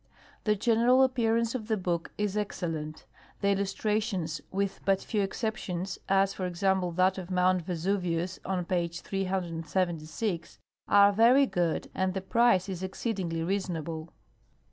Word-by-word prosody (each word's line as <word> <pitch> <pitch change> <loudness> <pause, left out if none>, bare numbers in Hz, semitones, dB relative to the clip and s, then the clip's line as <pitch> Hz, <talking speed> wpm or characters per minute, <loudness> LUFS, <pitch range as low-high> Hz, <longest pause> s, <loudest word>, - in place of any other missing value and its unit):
The 210 -1 +3
general 235 +5 +4
appearance 230 -3 +1
of 225 -5 -4
the 220 -1 +1
book 175 -3 -2
is 210 -1 -1
excel 195 -4 -2
lent. 155 -1 -6 0.4
The 200 - +2
illustrations, 200 -3 -1
with 195 0 -1
but 195 -1 +2
few 215 -3 -1
exceptions 195 -3 -3
(as, 195 0 +3
for 185 -2 -3
example, 180 0 +1
that 185 +2 +2
of 180 -1 -8
mount 185 0 +2
Vesuvius, 180 0 -1
on 180 -2 -2
page 170 -1 -1
376), 175 -1 -2 0.3
are 200 0 +6
very 240 +6 +6
good 175 -9 -1
and 190 0 -1
the 190 - -1
price 200 -1 +3
is 185 -2 -5
exceed 195 +4 -3
ingly 165 -3 -2
reasonable. 170 -4 -3
190 Hz, 145 wpm, -29 LUFS, 175-210 Hz, 0.4 s, are